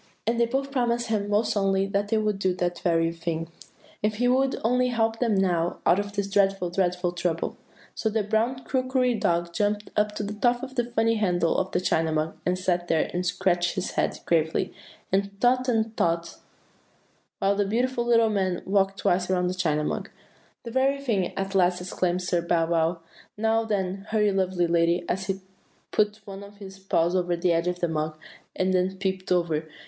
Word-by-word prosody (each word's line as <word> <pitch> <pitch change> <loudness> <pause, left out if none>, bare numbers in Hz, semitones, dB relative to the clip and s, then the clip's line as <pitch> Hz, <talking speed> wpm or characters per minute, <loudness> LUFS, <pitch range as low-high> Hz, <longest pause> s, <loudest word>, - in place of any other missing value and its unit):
"And 230 +2 0
they 235 - +3
both 270 +3 -2
promised 240 -3 0
him 205 -2 0
most 210 +2 +2
solemnly 195 -1 +1
that 200 +1 -1
they 220 - +1
would 210 -2 0
do 185 -2 +1
that 175 -1 -2
very 165 -2 +2
thing, 165 0 -4 0.5
if 210 0 0
he 245 +3 +1
would 265 +2 +2
only 250 +2 +2
help 225 -2 0
them 230 -4 +2
now 175 -3 +1
out 180 - +4
of 205 0 -4
this 200 -1 -1
dreadful, 195 -3 +1
dreadful 180 -1 0
trouble. 175 -2 -2 0.4
So 220 - -1
the 220 0 0
brown 230 +5 0
crockery 255 -1 +1
dog 170 -5 0
jumped 205 +2 -1
up 210 0 +1
to - - -3
the 205 +1 -4
top 240 +3 +1
of 260 -1 -6
the 240 -3 0
funny, 230 -1 +1
twisted 225 - -1
handle 175 -3 +2
of 190 - 0
the - - +1
China 160 -3 +1
Mug, 155 +1 -1
and 180 0 +1
sat 180 -1 0
there 160 -2 +1
and 180 +1 -1
scratched 175 -1 +1
his 185 - -2
head - - 0
very - - -15 0.2
gravely, 160 +4 -3 0.4
and 200 +1 0
thought 255 +2 +3
and 225 -1 0
thought, 170 -2 0 1.0
while 195 +1 +2
the 205 - +2
beautiful 240 +4 0
little 230 -2 +4
man 190 -3 -1
walked 195 0 +1
twice 180 0 +1
around 180 -1 +1
the - - -2
China 155 -5 0
Mug. - - -3 0.5
'The 235 - -7
very 265 +3 +2
thing!' 215 -10 0
at 195 0 -2
last 180 -1 +3
exclaimed 180 0 -1
Sir 175 -1 0
Bow 170 -1 +1
wow. 165 0 0 0.4
'Now, 225 +1 +1
then, 195 -2 -2
hurry, 210 -2 +2
lovely 185 -2 +1
lady,' 170 +1 +2
and 185 - 0
he 190 0 -3 0.5
put 210 0 +1
one 195 0 -8
of 200 0 -13
his 195 -1 -11
paws 175 -2 +1
over 175 -1 +1
the 175 +1 +1
top 170 +1 +1
of 180 0 -1
the 175 - +2
mug, 155 -1 -2 0.4
and 185 0 +1
then 185 +1 +1
peeped 190 -1 -3
over. 165 -3 +1
195 Hz, 205 wpm, -26 LUFS, 175-220 Hz, 1.0 s, out